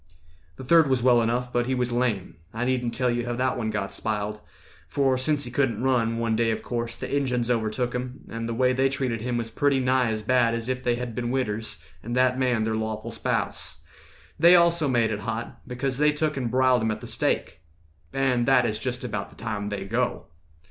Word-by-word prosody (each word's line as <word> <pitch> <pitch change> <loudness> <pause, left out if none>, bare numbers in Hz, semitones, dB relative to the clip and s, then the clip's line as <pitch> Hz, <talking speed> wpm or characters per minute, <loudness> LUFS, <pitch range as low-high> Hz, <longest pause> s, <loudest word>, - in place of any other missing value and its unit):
"The 130 - -9
third 160 +2 +5
was 130 -3 +1
well 125 -2 +5
enough, 125 +2 -1
but 120 0 +1
he 130 - +1
was 125 -1 0
lame; 120 -9 -1 0.2
I 120 +2 -1
needn't 125 -2 0
tell 125 0 +1
you 120 0 -2
how 120 - -1
that 130 +2 0
one 110 -3 -2
got 100 -2 -3
spiled; 105 -1 -2 0.5
For 135 -2 +2
sense 145 +3 0
he 120 - -6
couldn't 120 -4 0
run, 115 -3 +2
one 115 -1 0
day, 115 0 +2
of 110 - -2
course, 120 -1 -3
The - - -4
Injuns 125 -4 0
overtook 115 +1 -1
him, 125 +1 -5
and 115 0 -5
the - - -1
way 130 +1 +3
They 135 +1 +2
treated 130 -4 -2
him 120 +1 -1
was 115 -1 -3
pretty 140 +3 +2
nigh 130 -1 +2
as 110 -1 -2
bad 120 0 +3
As 115 +1 -4
if 130 0 -1
they 120 -1 +2
had 120 -1 -5
been 120 +1 -3
widders, 110 -7 -2 0.2
and 120 +2 -4
that 130 0 +3
man 125 -4 +2
Their 110 0 0
lawful 110 +1 -3
spouse. 115 -3 -3 0.6
They 175 +2 +8
also 170 -3 +4
made 120 -4 +2
it 105 - -2
hot, 115 +2 -5
Because 130 +1 -3
they 150 0 +5
took 150 +1 -1
and 125 -4 -2
briled 130 -1 +3
him 110 - 0
at 110 0 -3
the - - -8
stake. - - -1 0.5
And 130 -3 +1
that 130 -2 +5
is 110 -2 -1
just 125 +1 -3
about 110 -5 -4
the - - -18
time 105 -2 -4
they 100 -1 -4
go. 120 +5 -1
120 Hz, 225 wpm, -25 LUFS, 115-130 Hz, 0.6 s, They